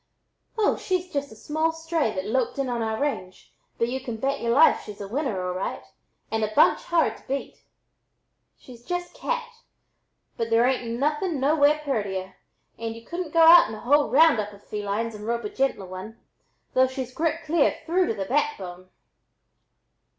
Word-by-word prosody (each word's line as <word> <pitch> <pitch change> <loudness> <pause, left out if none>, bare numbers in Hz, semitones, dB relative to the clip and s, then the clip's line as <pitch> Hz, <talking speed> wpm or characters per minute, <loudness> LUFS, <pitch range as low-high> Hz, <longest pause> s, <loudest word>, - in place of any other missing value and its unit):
"Oh, 430 - +2
she's 365 -1 -2
just 280 -2 -2
a - - -11
small 315 +7 -1
stray 325 -6 -1
that 185 0 -3
loped 245 +4 -1
in 275 -2 -1
on 240 -1 -2
our 220 -1 -2
range, 185 -11 -4 0.2
but 230 - +1
y'u 260 +2 -2
can 240 -4 -6
bet 275 +4 -1
ye'r 235 - -1
life 270 +7 +5
she's 210 -1 -10
a 200 - -6
winner 225 -6 -2
all 180 - -2
right 185 +2 -4 0.5
and 220 0 0
a 215 - -1
bunch - - +5
hard 340 -2 +1
to - - -22
beat. 275 +1 -4 1.0
She's 240 -2 -14
'just 355 +5 -4
cat,' 475 -2 -4 0.8
but 230 0 -2
there 230 +1 +4
ain't 245 -3 -1
nothing 300 +3 0
nowhere 290 +2 +3
purtier, 195 -8 -2 0.5
and 225 0 -4
y'u 230 0 -12
couldn't 345 -2 -5
go 330 - +4
out 330 -7 +9
in 220 - -6
a - - -9
whole 290 +4 +3
round 305 -3 +5
up 210 0 -3
of 200 - -16
felines 210 +2 -3
and 210 0 -8
rope 235 0 -1
a - - -3
gentler 270 - -1
one, 185 +5 -9 0.5
though 260 0 +4
she's 260 -1 -6
grit 330 +2 -1
clear 310 -1 +2
through 360 +2 +2
to 225 - -1
the 195 -2 -3
backbone." 190 -9 -2
260 Hz, 185 wpm, -25 LUFS, 220-315 Hz, 1.0 s, out